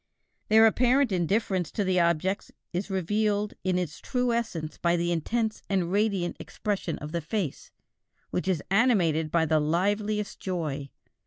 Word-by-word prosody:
Their 220 +1 +7
apparent 250 +3 +3
indifference 185 -1 0
to 205 - 0
the 185 -1 +2
objects 170 +3 +1 0.2
is 185 +4 -2
revealed 205 +2 0
in 185 -1 +1
its 170 -3 -3
true 250 -2 0
essence 175 -10 -3
by 170 0 +2
the 170 0 0
intense 220 +6 -1
and 185 -3 0
radiant 200 -3 0
expression 200 -5 -3
of 150 - -7
the 170 0 -2
face, 165 -1 -3 0.6
which 180 - -2
is 180 -6 0
animated 185 -9 +3
by 165 0 +2
the 155 0 +3
liveliest 205 +7 0
joy. 155 -7 -3
185 Hz, 150 wpm, -27 LUFS, 170-210 Hz, 0.6 s, Their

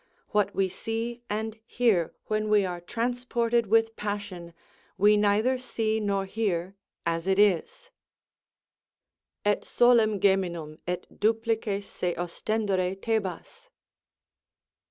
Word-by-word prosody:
What 210 -2 +1
we 195 -1 +2
see 225 +5 -4
and 220 +1 -3
hear 225 -8 +1
when 215 0 -1
we 210 -2 +4
are 175 -1 -4
transported 235 +2 0
with 225 +1 +3
passion, 200 -5 -5 0.4
we 205 +2 +5
neither 210 +5 +2
see 220 -3 -1
nor 200 -2 0
hear 190 -3 -2 0.3
as 165 +1 -1
it 190 0 +2
is: 205 - +2 1.5
Et 205 0 +2
solem 230 -4 +4
geminum, 175 -6 0
et 180 0 -2
duplices 220 -2 0
se 180 -3 -3
ostendere 190 +1 -1
Thebas. 225 - -3
210 Hz, 110 wpm, -27 LUFS, 190-225 Hz, 1.5 s, we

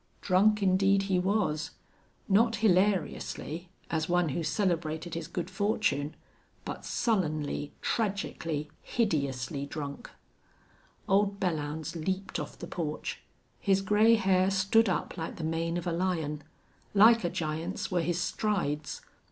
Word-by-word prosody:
Drunk 205 +3 +3
indeed 195 +1 +4
he 190 -2 +1
was; 180 -5 0 0.6
not 225 +3 +4
hilariously, 185 -4 +1 0.2
as 160 0 0
one 175 -2 +2
who 145 - -2
celebrated 165 -2 -1
his 165 -2 -4
good 175 0 -3
fortune, 190 -7 0 0.5
but - - -6
sullenly, 155 - -1
tragically, 165 -8 -2
hideously 140 - -1
drunk. 140 -2 -6 1.0
Old 200 0 +2
Belllounds 155 -3 -2
leaped 190 +4 -2
off - - -6
the - - -7
porch. 155 -3 -4 0.4
His 195 -1 +2
gray 210 +4 +5
hair 190 -3 +3
stood 195 +3 +3
up 180 - -2
like 165 -1 -4
the 165 - -6
mane 165 +1 -1
of 175 - -4
a 175 - 0
lion. 165 -4 -1 0.5
Like 225 +2 +7
a 175 - +1
giant's 170 +6 -3
were 180 -2 +2
his 170 +1 0
strides. 175 -7 -1
180 Hz, 125 wpm, -30 LUFS, 155-195 Hz, 1.0 s, Like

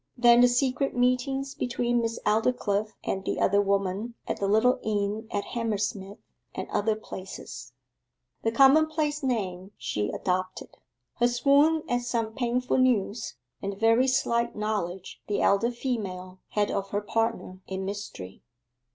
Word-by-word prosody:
Then 240 0 +6
the 245 - +7
secret 255 +2 0
meetings 270 +2 +1
between 240 0 0
Miss 230 0 -2
Aldclyffe 215 -1 +1
and 190 - -2
the - - -2
other 200 +1 +3
woman 200 +3 -1
at - - -2
the 200 - -1
little 240 +5 +3
inn 210 +1 -2
at 205 - -2
Hammersmith 205 -3 -3 0.4
and - - -4
other 215 +1 +1
places: 195 -3 -9 0.7
the 225 - 0
commonplace 300 +4 +4
name 200 -7 -2
she 105 0 -2
adopted: 185 0 -2 0.5
her 240 - +4
swoon 285 +6 +3
at 245 0 0
some 230 -2 -2
painful 250 +1 0
news, 225 -3 +1 0.3
and 200 0 -3
the - - -12
very 225 +4 +4
slight 235 -2 +1
knowledge 205 -4 -3
the 205 - 0
elder 200 +4 +3
female 195 -7 -4
had 210 -1 0
of 195 0 -2
her 205 +1 -1
partner 225 -3 -2
in 190 0 -4
mystery. 195 - -7
225 Hz, 145 wpm, -27 LUFS, 200-245 Hz, 0.7 s, the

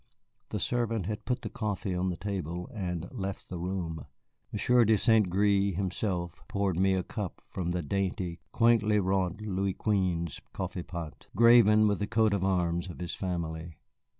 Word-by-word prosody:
The - - -2
servant 115 -5 0
had 105 +2 -4
put 125 0 -1
the 110 - -3
coffee 105 -3 -2
on 90 +1 0
the 90 - -3
table 90 -3 -4
and 90 -5 -3
left 100 -6 -5
the 90 - -5
room. 85 -4 -3 0.4
Monsieur 120 +4 +4
de 110 0 +4
St. 110 -3 +4
Gré 100 0 +2
himself 90 -2 -2
poured 100 -3 0
me 95 0 +4
a 95 - 0
cup 105 -3 -5
from 90 -2 -3
the 90 0 -1
dainty, 95 0 -2
quaintly 115 -3 +4
wrought 95 0 0
Louis 95 -2 -1
Quinze 90 -6 0
coffeepot, 85 -3 -5
graven 115 -2 +7
with 100 -1 +1
the 105 - -1
coat 110 -1 +3
of 100 -2 0
arms 90 -2 +1
of 85 - -8
his 90 -1 -4
family. 85 -3 -4
95 Hz, 165 wpm, -30 LUFS, 90-105 Hz, 0.4 s, graven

